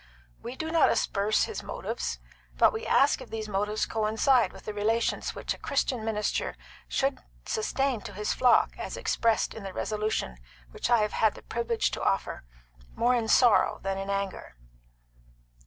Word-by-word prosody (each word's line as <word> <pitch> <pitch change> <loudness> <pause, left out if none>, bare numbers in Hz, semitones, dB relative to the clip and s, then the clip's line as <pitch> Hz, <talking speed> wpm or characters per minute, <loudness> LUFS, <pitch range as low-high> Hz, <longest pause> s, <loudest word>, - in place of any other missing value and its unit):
We 245 - -6
do 320 +3 -4
not 330 -2 +5
asperse 205 +1 +1
his 445 - -4
motives; - - -4 0.4
but - - +5
we 445 +1 -4
ask 275 0 +4
if 255 - -10
these 220 -1 -4
motives 210 +1 -1
coincide 225 +3 +2
with - - -14
the 215 - -4
relations 220 +3 0
which - - -2
a - - -13
Christian 245 -4 -1
minister 215 -1 -1 0.3
should 270 -1 0 0.3
sustain 275 - -1
to 205 - -8
his 210 +2 -1
flock 250 - +4
as - - -5
expressed 230 -2 +1
in 220 - -8
the 195 -1 -7
resolution 210 - -2 0.3
which - - -3
I 235 -3 +4
have 210 - -2
had 220 -2 +2
the - - -12
privilege 235 -1 -1
to - - -4
offer, - - -1 0.5
more 240 +2 +3
in 235 -3 0
sorrow 235 -1 +4
than 195 0 -2
in 195 0 -5
anger." 195 - -3
220 Hz, 170 wpm, -28 LUFS, 210-250 Hz, 0.5 s, not